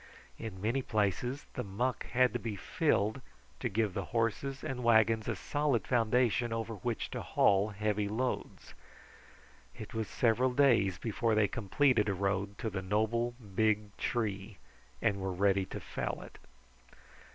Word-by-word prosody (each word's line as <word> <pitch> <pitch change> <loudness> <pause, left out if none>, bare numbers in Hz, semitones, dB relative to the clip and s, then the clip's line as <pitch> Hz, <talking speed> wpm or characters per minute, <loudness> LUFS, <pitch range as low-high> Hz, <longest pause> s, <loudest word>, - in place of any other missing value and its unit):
In 105 -5 -6
many 115 +7 0
places 115 +5 -1
the - - -3
muck 120 +6 -2
had 125 0 +3
to 120 - -1
be 115 -3 -4
filled 105 +5 0 0.4
to - - -1
give 105 -1 0
the 100 0 -3
horses 120 +4 -1
and 125 -2 -4
wagons 110 -1 +4
a - - 0
solid 145 -7 0
foundation 120 0 +2
over 115 0 -3
which 115 +3 -3
to - - -4
haul 100 +2 +3
heavy 105 0 -1
loads. 125 +5 -3 1.0
It 110 - -8
was 110 -2 -2
several 125 +2 +2
days 115 -10 +4
before 115 +1 0
they 105 -1 +4
completed 115 +1 +2
a 100 - 0
road 100 +1 -1
to 115 -2 -3
the 95 -1 -3
noble, 110 +5 0 0.2
big 105 0 +1
tree 105 -4 -2 0.5
and 105 -4 +2
were 95 0 -2
ready 95 +1 +2
to - - -6
fell - - -4
it. - - -13
110 Hz, 150 wpm, -32 LUFS, 100-120 Hz, 1.0 s, wagons